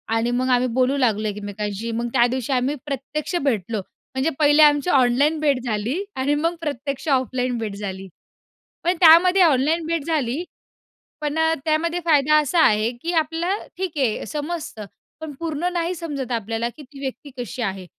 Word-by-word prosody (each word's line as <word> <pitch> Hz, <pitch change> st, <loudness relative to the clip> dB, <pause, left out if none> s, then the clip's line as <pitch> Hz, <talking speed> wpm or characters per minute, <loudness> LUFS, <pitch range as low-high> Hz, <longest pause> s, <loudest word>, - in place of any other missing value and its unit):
आणि 230 Hz, +2 st, +1 dB
मग 255 Hz, +1 st, 0 dB
आम्ही 250 Hz, 0 st, +3 dB
बोलू 260 Hz, +2 st, +2 dB
लागलो 220 Hz, -5 st, +1 dB
एकमेकांशी. 205 Hz, +2 st, -4 dB
मग 235 Hz, +1 st, -2 dB
त्या 240 Hz, -2 st, +5 dB
दिवशी 260 Hz, 0 st, -3 dB
आम्ही 255 Hz, +3 st, 0 dB
प्रत्यक्ष 285 Hz, +4 st, -4 dB
भेटलो. 225 Hz, -5 st, -1 dB, 0.4 s
म्हणजे 265 Hz, +4 st, +1 dB
पहिले 295 Hz, +1 st, +6 dB
आमची 295 Hz, +3 st, +4 dB
ऑनलाईन 275 Hz, +3 st, +3 dB
भेट 285 Hz, -4 st, +2 dB
झाली 240 Hz, -, -2 dB
आणि 275 Hz, +3 st, +1 dB
मग 330 Hz, +3 st, 0 dB
प्रत्यक्ष 280 Hz, -1 st, -4 dB
ऑफलाईन 255 Hz, -2 st, 0 dB
भेट 215 Hz, -3 st, -4 dB
झाली. 195 Hz, -2 st, -6 dB, 0.8 s
पण 355 Hz, +2 st, +2 dB
त्यामध्ये 360 Hz, +3 st, +7 dB
ऑनलाईन 315 Hz, +2 st, +2 dB
भेट 330 Hz, -3 st, -1 dB
झाली 295 Hz, -1 st, -1 dB, 0.8 s
पण 300 Hz, +1 st, -2 dB
अ, 320 Hz, 0 st, +3 dB
त्यामध्ये 330 Hz, +2 st, 0 dB
फायदा 305 Hz, -2 st, +4 dB
असा 310 Hz, +3 st, +1 dB
आहे 215 Hz, +2 st, +2 dB
की 340 Hz, +2 st, -2 dB
आपलं 330 Hz, +4 st, -1 dB
ठीक 360 Hz, -5 st, -4 dB
आहे 245 Hz, -6 st, 0 dB
समजतं. 295 Hz, -, -5 dB, 0.3 s
पण 315 Hz, -2 st, -6 dB
पूर्ण 335 Hz, +2 st, -2 dB
नाही 345 Hz, 0 st, -1 dB
समजत 290 Hz, -7 st, -5 dB
आपल्याला 225 Hz, +1 st, -2 dB
की 305 Hz, -, -11 dB
ती 275 Hz, 0 st, -14 dB
व्यक्ती 275 Hz, +1 st, -6 dB
कशी 240 Hz, +1 st, -5 dB
आहे. 190 Hz, -3 st, -3 dB
275 Hz, 165 wpm, -22 LUFS, 240-320 Hz, 0.8 s, त्यामध्ये